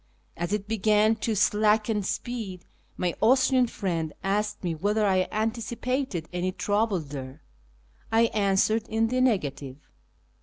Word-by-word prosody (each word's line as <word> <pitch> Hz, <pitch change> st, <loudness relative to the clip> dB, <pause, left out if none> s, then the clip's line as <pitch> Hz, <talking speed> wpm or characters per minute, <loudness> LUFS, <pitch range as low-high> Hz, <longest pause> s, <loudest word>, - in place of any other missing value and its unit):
As 175 Hz, +2 st, -3 dB
it 205 Hz, -1 st, -2 dB
began 215 Hz, 0 st, +3 dB
to 220 Hz, 0 st, -1 dB
slacken 210 Hz, +1 st, +2 dB
speed, 200 Hz, -3 st, -4 dB, 0.3 s
my 175 Hz, -2 st, 0 dB
Austrian 255 Hz, +1 st, +4 dB
friend 170 Hz, -8 st, -3 dB
aslced 210 Hz, +2 st, -1 dB
me 175 Hz, -2 st, -1 dB
whetlier 205 Hz, +6 st, 0 dB
I 185 Hz, -2 st, +2 dB
antici})ated 230 Hz, -, -2 dB
any 180 Hz, +1 st, -1 dB
trouble 205 Hz, +1 st, 0 dB
there. 140 Hz, -2 st, -8 dB, 0.7 s
I 225 Hz, +1 st, +4 dB
answered 210 Hz, +2 st, +2 dB
in 225 Hz, +1 st, +1 dB
the 255 Hz, +1 st, +1 dB
negative. 145 Hz, -, 0 dB
210 Hz, 125 wpm, -26 LUFS, 185-225 Hz, 0.7 s, Austrian